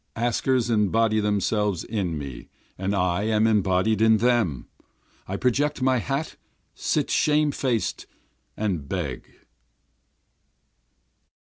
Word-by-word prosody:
Askers 120 +1 0
embody 110 +1 +2
themselves 105 -2 0
in 95 -8 -2
me 70 -4 -8 0.3
and 95 +2 -2
I 90 0 +1
am 110 0 +2
embodied 105 0 +2
in 110 0 +5
them, 110 - +1 0.6
I 95 - -3
project 145 +7 0
my 130 -1 +2
hat, 135 +7 -3 0.4
sit - - -1
shame 150 -1 +2
faced, 125 -5 -2 0.5
and 90 -10 -2
beg. - - -4
110 Hz, 105 wpm, -24 LUFS, 95-120 Hz, 0.6 s, in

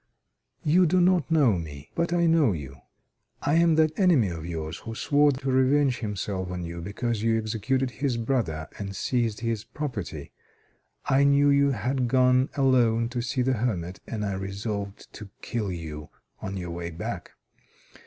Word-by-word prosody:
"You 175 +4 +4
do 185 +4 +3
not 180 -4 +3
know 140 - +3
me, 75 -2 -9
but 170 0 -1
I 175 0 +2
know 160 - +4
you. 70 -4 -7 0.7
I 145 - +1
am 170 -1 +4
that 155 +1 +2
enemy 165 - +4
of 85 -1 -6
yours 80 -1 -5
who 115 0 -7
swore 145 +4 +3
to 135 0 -3
revenge 130 0 +3
himself 100 -4 -3
on 90 -1 -4
you, 85 0 -6
because 105 +4 -3
you 115 0 +2
executed 115 +4 -1
his 130 -1 -1
brother 110 - -1
and 100 -1 -5
seized 115 +1 -1
his 115 -2 -2
property. 110 - -6 0.7
I 135 +1 +3
knew 140 0 +4
you 140 0 +4
had 125 +3 -1
gone 125 +1 +3
alone 120 -4 +3
to 120 0 -3
see 125 +2 -1
the 130 +1 +2
hermit, 95 -7 -2
and 105 -2 -3
I 100 - -2
resolved 100 +1 -5
to 105 -1 -9
kill 105 -5 -2
you 75 -4 -7 0.3
on 95 0 -4
your 90 -2 -5
way 85 0 -4
back. 85 - -6
115 Hz, 170 wpm, -26 LUFS, 95-135 Hz, 0.7 s, You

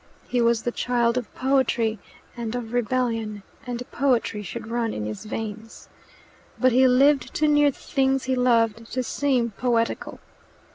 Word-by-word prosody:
He 245 - 0
was 235 -1 +2
the 240 - -1
child 240 -1 +1
of 250 -3 -3
poetry 255 -5 +1 0.4
and 235 -1 -4
of 240 -2 -5
rebellion, 225 -3 -1 0.2
and 245 0 -4
poetry 240 -5 +1
should 220 +4 -7
run 230 0 -2
in 105 - -3
his 105 - -6
veins. 220 +1 -7 0.7
But 255 0 +4
he 260 +2 +5
lived 270 +2 +3
too 305 - +2
near 295 -1 +5
the 275 - -8
things 270 -1 0
he 260 - -1
loved 230 -3 +1
to 255 +1 0
seem 250 -2 0
poetical. 230 +2 -1
240 Hz, 155 wpm, -24 LUFS, 225-255 Hz, 0.7 s, he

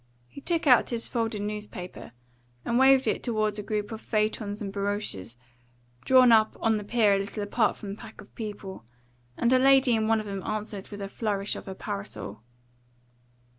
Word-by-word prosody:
He 280 - -12
took 335 +2 0
out 250 -4 +5
his 230 -1 -2
folded 225 -3 -2
newspaper 210 - -6 0.5
and 235 +1 +1
waved 265 0 +6
it - - 0
toward 215 -3 -1
a - - -2
group 210 +1 -3
of 220 0 -6
phaetons 215 -1 -1
and 200 -2 -5
barouches 200 - -3 0.7
drawn 255 -2 +6
up 220 -1 +4
on 225 -1 +2
the 210 - -5
pier 215 -1 +3
a 195 - +2
little 205 +1 -4
apart 215 +3 +1
from 205 - -8
the 200 - -7
pack 225 -2 -12
of 205 - -14
people, 205 - -7 0.5
and 240 +2 +2
a 255 - +5
lady 265 -2 +5
in 220 -1 0
one 225 0 +3
of 215 - -5
them 195 -1 -4
answered 210 -1 -5
with 205 -1 -8
a 195 - -3
flourish 200 -1 -2
of - - -9
her 190 - -6
parasol. 200 - -6
215 Hz, 190 wpm, -27 LUFS, 200-230 Hz, 0.7 s, waved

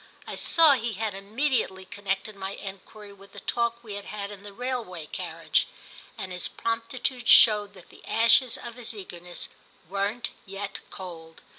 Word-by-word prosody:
I - - -6
saw 325 -2 +6
he 235 -3 0
had 215 0 -1
immediately 205 -1 0
connected 200 +2 -2
my 195 0 -4
enquiry 200 +1 -9
with 195 0 -16
the - - -7
talk 235 0 0
we 215 -3 -7
had 200 0 -6
had 205 -1 -5
in 200 -1 -9
the 205 0 -9
railway 225 -8 -3
carriage, - - 0 0.5
and 185 - -5
his 180 0 0
promptitude 235 +2 -2
showed 210 -2 +7
that 180 -2 -15
the - - -16
ashes 230 +2 +5
of 235 - -7
his 235 -2 -4
eagerness 180 -3 -6 0.4
weren't 200 +5 -1
yet 195 +1 -5
cold. 165 -4 -9
205 Hz, 160 wpm, -28 LUFS, 195-230 Hz, 0.5 s, showed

